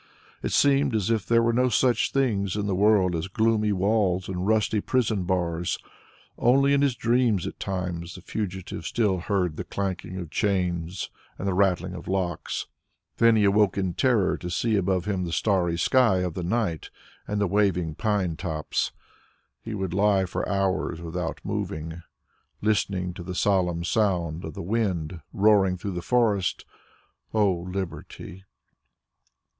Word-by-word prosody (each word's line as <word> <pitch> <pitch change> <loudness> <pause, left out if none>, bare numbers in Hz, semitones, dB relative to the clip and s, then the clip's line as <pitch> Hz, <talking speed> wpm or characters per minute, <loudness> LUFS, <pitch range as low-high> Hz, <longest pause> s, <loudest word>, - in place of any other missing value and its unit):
It - - -3
seemed 140 -3 +3
as 105 0 0
if 110 -3 0
there 115 0 +4
were 115 0 +2
no 125 +2 +3
such 120 0 +2
things 105 -8 0
in 105 -1 -1
the 100 - 0
world 95 -2 +3
as 80 +2 -2
gloomy 110 +1 +1
walls 95 -2 +1
and 95 0 -3
rusty 110 -1 +2
prison 110 -7 0
bars. 85 -2 -1 0.6
Only 135 +3 +4
in 140 - +3
his 140 -4 +2
dreams 115 -5 +2
at - - -6
times 90 -3 -4
the 95 - -10
fugitive 95 -1 -5
still 105 -6 +1
heard 90 -3 -1
the - - -3
clanking 95 -2 -4
of 85 -4 -6
chains 90 -2 -1 0.3
and 100 - -4
the 95 - +1
rattling 95 -1 +1
of 85 -1 -8
locks; 90 -3 -2 0.5
then 115 -1 +5
he 110 - +3
awoke 100 0 +3
in 95 -3 0
terror 120 -5 +2
to 90 - -6
see 110 +5 0
above 95 -2 +1
him 95 -3 -1
the 85 - -4
starry 90 -3 +1
sky 105 0 +3
of 90 -3 -3
night 90 -2 -1 0.4
and 105 0 -1
the 100 - +2
waving 90 -4 +1
pine 100 -3 0
tops. 75 -1 -2 0.7
He 110 -1 -5
would 95 -3 -3
lie 100 0 +3
for 90 - -3
hours 95 -4 0
without 85 0 -4
moving, 80 +2 -4 0.6
listening 95 -4 0
to 90 - -8
the 90 +1 -6
solemn 90 -4 +1
sound 90 -5 0
of 80 - -7
the - - -5
wind 90 -5 -1
roaring 100 -2 +4
through 100 +2 -4
the 90 - -3
forest. 105 -3 +1 0.7
O 105 -3 +4
Liberty! 90 +2 -6
95 Hz, 160 wpm, -26 LUFS, 90-105 Hz, 0.7 s, then